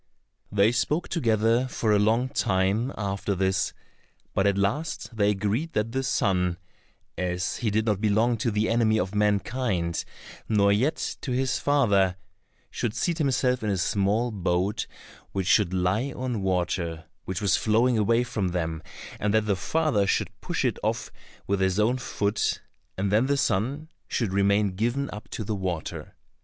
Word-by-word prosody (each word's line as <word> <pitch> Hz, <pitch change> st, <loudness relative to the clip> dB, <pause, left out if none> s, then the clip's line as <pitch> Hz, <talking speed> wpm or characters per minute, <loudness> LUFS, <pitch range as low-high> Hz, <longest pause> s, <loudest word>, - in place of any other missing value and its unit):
They 105 Hz, +2 st, +4 dB
spoke 150 Hz, +7 st, 0 dB
together 115 Hz, -2 st, +2 dB
for 115 Hz, -3 st, -1 dB
a 105 Hz, -, +4 dB
long 115 Hz, +5 st, +2 dB
time 100 Hz, +5 st, +1 dB
after 100 Hz, 0 st, -2 dB
this, 95 Hz, 0 st, +1 dB, 0.6 s
but 95 Hz, -, +2 dB
at 100 Hz, -1 st, +2 dB
last 125 Hz, +5 st, -2 dB
they 105 Hz, -2 st, +3 dB
agreed 105 Hz, +11 st, -1 dB
that 105 Hz, +1 st, 0 dB
the 135 Hz, +2 st, -1 dB
son, 90 Hz, -9 st, +1 dB, 0.6 s
as 90 Hz, 0 st, -1 dB
he 115 Hz, -, -1 dB
did 110 Hz, +1 st, +1 dB
not 105 Hz, -3 st, 0 dB
belong 110 Hz, +3 st, +2 dB
to 115 Hz, -, 0 dB
the 105 Hz, 0 st, 0 dB
enemy 110 Hz, -1 st, +2 dB
of 95 Hz, +1 st, -2 dB
mankind, 105 Hz, -3 st, 0 dB, 0.5 s
nor 100 Hz, -2 st, +4 dB
yet 130 Hz, +10 st, 0 dB
to 130 Hz, -, -3 dB
his 130 Hz, +1 st, 0 dB
father, 100 Hz, -10 st, +3 dB, 0.6 s
should 115 Hz, -3 st, -2 dB
seat 170 Hz, -1 st, -1 dB
himself 130 Hz, -3 st, +1 dB
in 110 Hz, -, -1 dB
a 100 Hz, -, +1 dB
small 100 Hz, +6 st, +1 dB
boat, 95 Hz, +2 st, -1 dB, 0.5 s
which 95 Hz, -2 st, -1 dB
should 90 Hz, +1 st, +3 dB
lie 95 Hz, +9 st, 0 dB
on 125 Hz, -4 st, -3 dB
water 85 Hz, -3 st, -1 dB, 0.2 s
which 95 Hz, -1 st, -3 dB
was 100 Hz, -2 st, +2 dB
flowing 115 Hz, +3 st, +2 dB
away 115 Hz, +3 st, +3 dB
from 105 Hz, -5 st, -2 dB
them, 80 Hz, -3 st, -2 dB, 0.4 s
and 105 Hz, 0 st, +1 dB
that 110 Hz, -1 st, +3 dB
the 100 Hz, -2 st, +1 dB
father 105 Hz, -, +1 dB
should -, -, 0 dB
push -, -, -2 dB
it -, -, 0 dB
off -, -, -2 dB, 0.3 s
with 100 Hz, 0 st, 0 dB
his 95 Hz, +1 st, +1 dB
own 120 Hz, +5 st, +2 dB
foot, 105 Hz, -3 st, -1 dB, 0.4 s
and 95 Hz, +1 st, 0 dB
then 110 Hz, +5 st, +3 dB
the 140 Hz, 0 st, +2 dB
son 140 Hz, +5 st, 0 dB, 0.2 s
should 110 Hz, -6 st, -1 dB
remain 100 Hz, +1 st, +3 dB
given 120 Hz, +9 st, -1 dB
up 105 Hz, 0 st, -9 dB
to 110 Hz, -, -4 dB
the 105 Hz, +1 st, -3 dB
water. 90 Hz, -5 st, -4 dB
105 Hz, 165 wpm, -26 LUFS, 95-120 Hz, 0.6 s, They